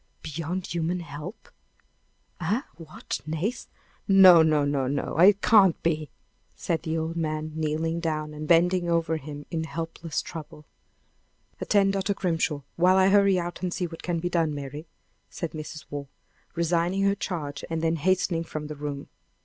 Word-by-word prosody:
"Beyond 165 +4 -4
human 175 +1 -2
help! 150 - -9 0.9
Eh! 200 - 0
what? 160 -2 -6
Nace! 165 +10 -3 0.4
No! 190 -4 +8
no! 155 -2 +3
no! 140 -2 0
no! 140 +1 -2
It 195 +3 +6
can't 200 -7 +5
be!" 155 -3 0 0.5
said 165 -2 -2
the 160 -1 -2
old 160 +1 -3
man, 155 -1 -2
kneeling 160 +1 -1
down, 155 -2 -2
and 150 0 -6
bending 175 +1 +3
over 165 -1 +1
him 145 -1 -8
in 165 -2 -1
helpless 165 0 -4
trouble. 150 -2 -9 0.9
"Attend 195 -1 +2
Dr. 195 +1 0
Grimshaw, 165 -6 -1 0.2
while 180 +2 +5
I 190 0 +5
hurry 200 -1 +5
out 175 0 -4
and 180 -1 -2
see 180 - -2
what 165 -1 -8
can 175 -1 -2
be 170 +2 -2
done, 165 -4 0
Mary," 145 +3 -7 0.4
said 170 - -5
Mrs. 155 0 -8
Waugh, 145 -1 -5 0.5
resigning 170 +3 +1
her 200 0 +3
charge, 160 -7 -4
and 165 0 -2
then 165 0 +1
hastening 175 0 +1
from 155 -2 -6
the 150 0 -6
room. 145 -1 -5
165 Hz, 160 wpm, -26 LUFS, 155-180 Hz, 0.9 s, No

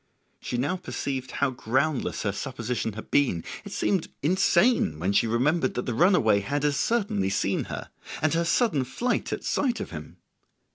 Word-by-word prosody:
She 125 - -4
now 145 +10 0
perceived 135 -7 -4
how 140 -1 0
groundless 130 +4 -1
her 100 - +1
supposition 115 -1 -3
had 110 - -9
been; 125 -13 +2 0.2
it - - -9
seemed 190 -5 0 0.2
insane 180 - +3
when 90 +5 0
she 115 - +3
remembered 130 +6 +1
that 125 - -2
the 120 - -2
runaway 120 - +4
had 140 +8 -2
as 145 -1 +2
certainly 140 - 0
seen 100 - 0
her - - -7 0.3
and 155 0 +1
her 165 +1 +2
sudden 170 - +2
flight 235 - -2
at - - -3
sight 250 -5 0
of - - -5
him. 75 -3 -9
135 Hz, 175 wpm, -26 LUFS, 110-170 Hz, 0.3 s, runaway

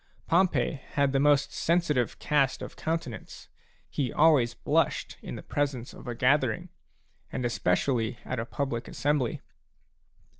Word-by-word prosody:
Pompey 170 -4 +2
had 140 -1 +2
the 135 - +2
most 145 0 +3
sensitive 155 -9 +1
cast 140 -4 +1
of - - -8
countenance; 160 -8 -4 0.4
he 130 -5 -2
always 145 -6 +4
blushed - - 0
in - - -6
the - - -8
presence 140 -4 -2
of - - -12
a 120 - -3
gathering, 150 +8 +2 0.6
and 125 - -2
especially 120 +2 0
at 125 - -3
a 115 - -2
public 130 -4 -3
assembly. 145 -4 0
140 Hz, 135 wpm, -28 LUFS, 125-150 Hz, 0.6 s, always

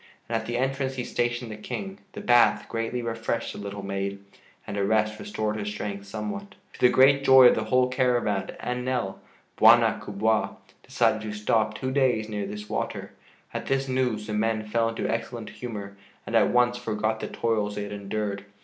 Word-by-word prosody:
And 115 - -2
at 115 0 -2
the 120 0 -1
entrance 135 +1 -1
he 125 - -3
stationed 120 -1 -2
the - - -5
King. 195 - -6
The - - -7
bath 120 -1 +4
greatly 115 +2 -3
refreshed 115 0 -2
the - - -8
little 100 0 -6
maid 100 0 -3 0.5
and - - -5
a 100 - 0
rest 110 +1 +1
restored 110 - -2
her 105 - -4
strength 105 -1 -5
somewhat. 110 - -5 0.2
To - - -14
the 125 - +6
great 135 +2 +5
joy 130 -1 +8
of - - +3
the 110 - -1
whole 125 +3 +3
caravan 125 -6 0
and 125 0 -3
Nell, 125 -7 -2 0.4
"Bwana - - +6
kubwa" 110 +2 0 0.3
decided 110 - +1
to 110 0 -5
stop 110 +1 +1
two 130 +2 -3
days 130 -5 +2
near 105 -2 -3
this 105 +1 -7
water. - - -3 0.4
At - - -4
this 135 0 0
news 125 -5 0
the 105 - -5
men 110 0 0
fell 115 +1 +1
into 115 - -3
excellent 115 0 -4
humor 105 -5 -7 0.3
and - - -3
at - - +5
once 120 0 +3
forgot 110 -1 -1
the - - -4
toils 105 -3 -1
they 105 - -3
had 100 - -7
endured. 100 0 -3
110 Hz, 195 wpm, -26 LUFS, 105-125 Hz, 0.5 s, joy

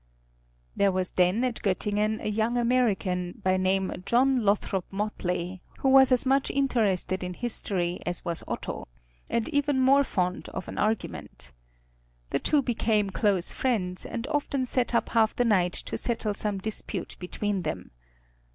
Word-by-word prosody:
There 200 -1 +3
was 185 -1 -1
then 185 +6 +2
at 250 -3 -1
Göttingen 210 +2 0
a - - -2
young 220 +3 0
American, 215 -7 0
by 185 0 +3
name 185 0 0
John 255 +3 +3
Lothrop 200 -2 +1
Motley, 185 -3 -3 0.2
who 270 - +1
was 265 0 +7
as 250 0 +4
much 270 +1 +2
interested 215 -9 0
in 180 0 -4
history 185 -6 -2
as 175 0 -3
was 170 -1 -3
Otto, - - -5 0.4
and 230 - 0
even 285 -2 +1
more 275 +2 +5
fond 180 -7 -2
of 185 - -6
an - - -6
argument. 65 - -3 0.8
The - - +1
two 290 - +2
became 215 -4 +1
close 195 -4 +2
friends, 185 -8 -1
and 235 0 -4
often 285 -3 -1
sat 245 -1 0
up - - +1
half 225 -2 +2
the 245 - +2
night 185 -6 +3
to - - -4
settle 225 -3 0
some 205 0 -1
dispute 195 -2 -4
between 195 +2 -2
them. 95 - -5
210 Hz, 155 wpm, -27 LUFS, 185-245 Hz, 0.8 s, was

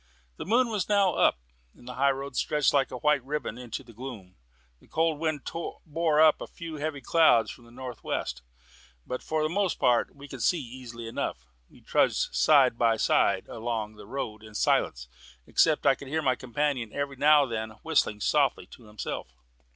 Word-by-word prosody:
The - - -6
moon 240 +3 +3
was 210 -4 -2
now 200 -3 +3
up, - - +3 0.4
and 120 - -17
the 125 - -6
high 140 +2 +2
road 135 0 -3
stretched 150 +2 +1
like 140 -2 +2
a 125 - -6
white 150 0 +2
ribbon 140 -4 -4
into 125 +2 -6
the 120 -2 -15
gloom. 110 -6 -9 0.4
The - - -23
cold 160 -2 0
wind 155 -3 -1 0.4
bore 160 -1 +1
up 155 -1 +5
a - - -5
few 165 -2 -8
heavy 145 -1 -3
clouds 120 -7 +4
from 120 - -14
the 115 - -17
north 125 0 -8
west, - - -3 0.6
but 125 - -4
for 155 -1 -1
the - - +2
most 195 +1 0
part 120 -2 +2
we 140 0 -11
could 135 -3 -8
see 175 +8 +2
easily 120 -3 -8
enough. 65 - -4 0.2
We - - -19
trudged - - +1
side 135 -6 +4
by 115 -1 +3
side - - +2
along 110 -2 -4
the 105 -1 -13
road 110 -4 -5
in 110 -1 -13
silence, - - +1 0.4
except - - +3
that - - +5
I - - +6
could 140 - -11
hear 155 +3 -1
my 130 - +3
companion 130 -2 -2
every 140 -1 -3
now 150 +1 +6
and 130 - -5
then 110 -1 -3
whistling 150 -10 +1
softly 140 0 +2
to 120 - -14
himself. 105 - -6
135 Hz, 195 wpm, -28 LUFS, 115-150 Hz, 0.6 s, I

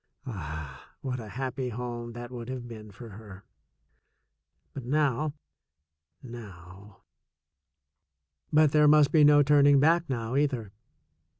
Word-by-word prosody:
Ah, 80 - -8
what 125 -2 -4
a 110 - -8
happy 130 +2 -4
home 120 0 -6
that 120 +1 -8
would 120 -1 -7
have 125 -2 -6
been 110 -2 -10
for 115 +3 -12
her! 100 -2 -12 1.3
But 135 - -7
now, 145 +2 0 0.9
now 100 -4 -12 1.5
But 155 -1 +4
there 150 0 +4
must 150 -1 +5
be 155 -2 +5
no 145 0 +6
turning 145 0 +5
back 165 +3 +3
now, 120 -1 -3
either. 130 -8 -1
125 Hz, 120 wpm, -28 LUFS, 110-145 Hz, 1.5 s, no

